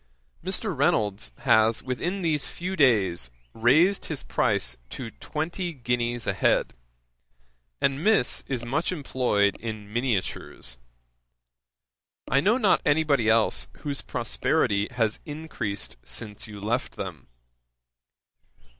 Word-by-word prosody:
'Mr. -, -, +1 dB
Reynolds 105 Hz, 0 st, +1 dB
has 110 Hz, 0 st, +4 dB
within 175 Hz, +10 st, -2 dB
these 150 Hz, -6 st, +1 dB
few 185 Hz, +6 st, -4 dB
days 100 Hz, -, +3 dB, 0.2 s
raised 155 Hz, -, +4 dB
his 155 Hz, -4 st, -4 dB
price -, -, 0 dB
to 115 Hz, -3 st, -6 dB
twenty 170 Hz, -, -4 dB
guineas 120 Hz, -2 st, -1 dB
a -, -, +1 dB
head, -, -, +2 dB, 1.1 s
and 140 Hz, +3 st, +1 dB
Miss 210 Hz, -, +3 dB
is 125 Hz, -3 st, -3 dB
much 140 Hz, +9 st, 0 dB
employed 125 Hz, -, +1 dB
in 110 Hz, -2 st, -7 dB
miniatures. 100 Hz, -, -2 dB, 1.5 s
I 140 Hz, -, +3 dB
know 210 Hz, -, +3 dB
not 205 Hz, -7 st, +3 dB
any 155 Hz, 0 st, +3 dB
body 140 Hz, -8 st, +2 dB
[else] 110 Hz, 0 st, +2 dB
whose 145 Hz, -2 st, -4 dB
prosperity 100 Hz, 0 st, 0 dB
has 115 Hz, -4 st, 0 dB
encreased 110 Hz, -, -4 dB
since 105 Hz, -, -4 dB
you 105 Hz, -1 st, -9 dB
left 115 Hz, +5 st, -2 dB
them. -, -, -6 dB
125 Hz, 115 wpm, -26 LUFS, 105-150 Hz, 1.5 s, has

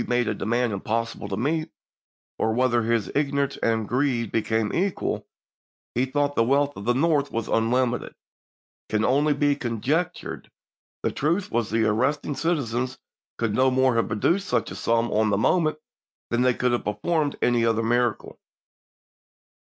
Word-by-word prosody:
made 120 Hz, -1 st, +1 dB
a -, -, +1 dB
demand 120 Hz, 0 st, 0 dB
impossible 115 Hz, +4 st, -3 dB
to 95 Hz, -, -3 dB
meet, 155 Hz, +7 st, -1 dB, 0.7 s
or 110 Hz, -, +1 dB
whether, 125 Hz, -1 st, +2 dB
his 115 Hz, -1 st, 0 dB
ignorance 140 Hz, -1 st, 0 dB
and 115 Hz, -2 st, 0 dB
greed 125 Hz, -4 st, 0 dB
being 110 Hz, -1 st, 0 dB
equal, 190 Hz, +1 st, -1 dB, 0.7 s
he 125 Hz, +2 st, +1 dB
thought 145 Hz, +2 st, 0 dB
the 115 Hz, -, +4 dB
wealth 140 Hz, +3 st, +2 dB
of 100 Hz, -, -8 dB
the 120 Hz, -, +2 dB
North 145 Hz, 0 st, +2 dB
was 115 Hz, -1 st, -2 dB
unlimited, 120 Hz, +2 st, 0 dB, 0.7 s
can 110 Hz, 0 st, +1 dB
only 145 Hz, +4 st, +3 dB
be 145 Hz, 0 st, +2 dB
conjectured; 145 Hz, +8 st, -2 dB, 0.5 s
the -, -, +1 dB
truth 170 Hz, +7 st, -1 dB
was 115 Hz, -2 st, 0 dB
the 110 Hz, 0 st, +1 dB
arrested 135 Hz, +7 st, 0 dB
citizens 130 Hz, -6 st, -1 dB, 0.4 s
could 115 Hz, -3 st, -1 dB
no 130 Hz, +3 st, +4 dB
more 130 Hz, 0 st, +3 dB
have 115 Hz, 0 st, +1 dB
produced 175 Hz, -, 0 dB
such -, -, 0 dB
a -, -, -6 dB
sum 115 Hz, 0 st, 0 dB
on 110 Hz, 0 st, +2 dB
the 100 Hz, -, +2 dB
moment 155 Hz, -, +2 dB, 0.5 s
than 120 Hz, +1 st, +2 dB
they 125 Hz, -1 st, +3 dB
could 125 Hz, -1 st, +1 dB
have 120 Hz, -, 0 dB
performed 150 Hz, +7 st, 0 dB
any 120 Hz, -1 st, +2 dB
other 115 Hz, 0 st, +2 dB
miracle. 120 Hz, 0 st, 0 dB
125 Hz, 160 wpm, -25 LUFS, 115-145 Hz, 0.7 s, the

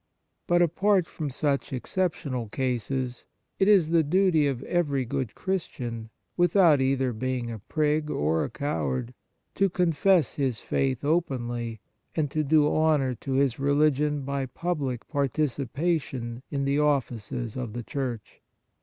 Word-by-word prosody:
But, 175 Hz, 0 st, +4 dB
apart 185 Hz, +2 st, +2 dB
from 155 Hz, -3 st, -5 dB
such 140 Hz, +1 st, -1 dB
exceptional 130 Hz, -, -2 dB
cases, 125 Hz, 0 st, -2 dB, 0.3 s
it 195 Hz, -, +4 dB
is 190 Hz, -7 st, +5 dB
the 165 Hz, -1 st, +5 dB
duty 160 Hz, -1 st, +3 dB
of 135 Hz, -2 st, -2 dB
every 145 Hz, -7 st, 0 dB
good 120 Hz, -1 st, -3 dB
Christian, 120 Hz, -12 st, -4 dB, 0.3 s
without 175 Hz, -4 st, +5 dB
either 130 Hz, -1 st, +1 dB
being 125 Hz, 0 st, -2 dB
a 110 Hz, -, -6 dB
prig 150 Hz, +6 st, 0 dB
or 80 Hz, -, +1 dB
a -, -, -3 dB
coward, 80 Hz, -, -2 dB, 0.4 s
to 195 Hz, 0 st, +2 dB
confess 175 Hz, -1 st, +2 dB
his 130 Hz, -5 st, -1 dB
faith 135 Hz, -1 st, -1 dB
openly 120 Hz, -, -1 dB, 0.3 s
and 150 Hz, -4 st, 0 dB
to 155 Hz, +1 st, 0 dB
do 150 Hz, 0 st, +4 dB
honour 150 Hz, -5 st, +2 dB
to 135 Hz, +3 st, -5 dB
his 135 Hz, -2 st, +2 dB
religion 145 Hz, +1 st, +2 dB
by 140 Hz, 0 st, -2 dB
public 140 Hz, -5 st, -3 dB
participation 140 Hz, -3 st, -1 dB
in 140 Hz, -1 st, -1 dB
the 140 Hz, +1 st, +1 dB
offices 120 Hz, -6 st, -1 dB
of 125 Hz, -4 st, -4 dB
the 120 Hz, 0 st, -5 dB
Church. 125 Hz, -4 st, -5 dB
140 Hz, 135 wpm, -27 LUFS, 125-155 Hz, 0.4 s, is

